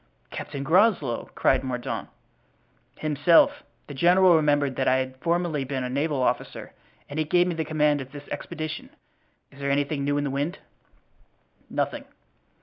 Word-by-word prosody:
"Captain 140 -2 -6
Groslow!" 160 - +2
cried 130 - +2
Mordaunt. 125 -2 -4 0.9
"Himself. 155 +2 +3 0.2
The 145 - -9
general 175 +4 +5
remembered 145 -3 +2
that 130 - 0
I 130 - +4
had 130 0 -2
formerly 170 -1 0
been 135 -1 -3
a 125 - -4
naval 140 0 0
officer - - -2 0.3
and 145 +2 -5
he - - +2
gave 175 +3 +3
me 180 - -1
the 160 -1 -2
command 150 -2 +1
of 130 0 -10
this 145 0 -10
expedition. 155 0 -5 0.6
Is 140 - -16
there 140 0 -2
anything 140 +1 0
new 145 +1 0
in 145 - 0
the 140 - -2
wind?" 145 +7 -2 1.1
"Nothing." - - -2
145 Hz, 155 wpm, -25 LUFS, 135-160 Hz, 1.1 s, general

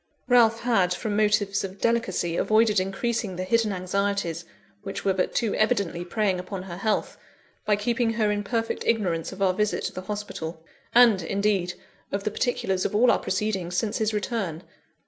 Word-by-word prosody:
Ralph 230 -2 +4
had, 195 -7 +2
from 215 -1 -3
motives 210 -1 +2
of 195 0 -6
delicacy, 195 -7 0
avoided 215 +1 +3
increasing 195 +1 -2
the 185 - -3
hidden 220 +3 +2
anxieties 185 -2 -1 0.4
which 200 -1 -6
were 195 - +3
but 185 -1 -1
too 230 -4 +1
evidently 200 -6 0
preying 190 +1 0
upon 185 +1 -6
her 175 -2 -7
health, 215 +2 -1 0.5
by 210 - +4
keeping 230 +2 0
her 215 -2 +1
in 205 0 -1
perfect 225 +2 -2
ignorance 180 -8 0
of 195 +1 -3
our 185 -1 +3
visit 210 +2 0
to - - -3
the 185 - -5
hospital, 180 -5 -6 0.3
and, 235 -6 +7
indeed, 195 0 0 0.4
of 195 0 -2
the 215 - -1
particulars 195 -5 -1
of - - -2
all 235 +3 +5
our - - +2
proceedings 190 -3 -2
since 220 +1 -1
his 220 -1 +1
return. 205 -6 -3
205 Hz, 175 wpm, -25 LUFS, 185-220 Hz, 0.5 s, and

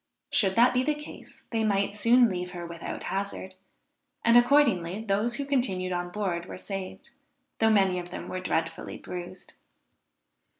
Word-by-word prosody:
Should 190 -3 +2
that 240 +2 +5
be 250 - +3
the 300 +3 0
case, 300 0 -11
they 225 -1 0
might 200 -1 +1
soon 240 +3 +5
leave 180 -2 -4
her 175 -1 -6
without 170 -1 -6
hazard; 195 -1 -4 0.7
and 235 0 +6
accordingly 235 -8 +4
those 210 +4 +1
who 280 - -3
continued 220 -10 0
on 175 0 -2
board 175 -3 -3
were - - -7
saved, 195 0 -7 0.5
though 225 - +4
many 195 -4 +3
of 175 0 -7
them - - -7
were 185 - -4
dreadfully 165 -2 -2
bruised. 180 +1 -8
195 Hz, 160 wpm, -28 LUFS, 180-235 Hz, 0.7 s, and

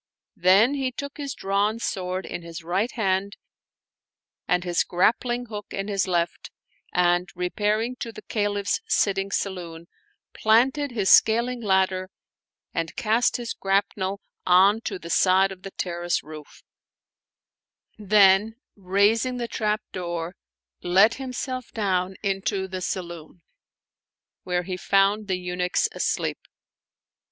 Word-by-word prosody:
Then 195 +9 +5
he 270 -2 -1
took 280 +3 -7
his 280 -2 -5
drawn 200 +3 0
sword 185 -4 -3
in - - -6
his 170 0 -9
right 190 +8 -1
hand 200 -2 -1 1.1
and 180 0 +1
his 175 -1 +1
grappling 240 +7 +1
hook 210 -3 -7
in 195 +1 -4
his 195 -2 0
left 170 -2 -1 0.4
and, 175 0 +2
repairing 210 +7 -1
to 230 - -5
the 215 - -11
Caliph's 205 -2 -1
sitting 195 -1 +1
saloon, 175 -4 -4 0.5
planted 260 +7 +3
his 210 -6 +1
scaling 235 +2 +4
ladder 190 -2 +1 0.6
and 165 -1 -3
cast 235 -1 +1
his 240 -1 -4
grap 195 +1 +1
nel 195 0 -3 0.2
on 195 +5 +5
to 195 - -3
the 170 -1 -8
side 190 +2 +4
of 185 -1 -10
the 195 - -7
terrace 175 -2 -2
roof; 155 -1 -12 1.4
then, 205 +1 +4 0.2
raising 205 +6 +1
the 240 -1 -3
trapdoor, 180 -6 -3 0.5
let 195 +6 +4
himself 255 -1 -4
down 190 -3 -1
into 195 0 -1
the 185 0 -5
saloon, 175 -2 -6 1.0
where 180 -1 -1
he 180 0 -4
found 195 +3 +2
the 185 -2 0
eunuchs 180 0 0
asleep. - - -1
195 Hz, 125 wpm, -25 LUFS, 180-220 Hz, 1.4 s, Then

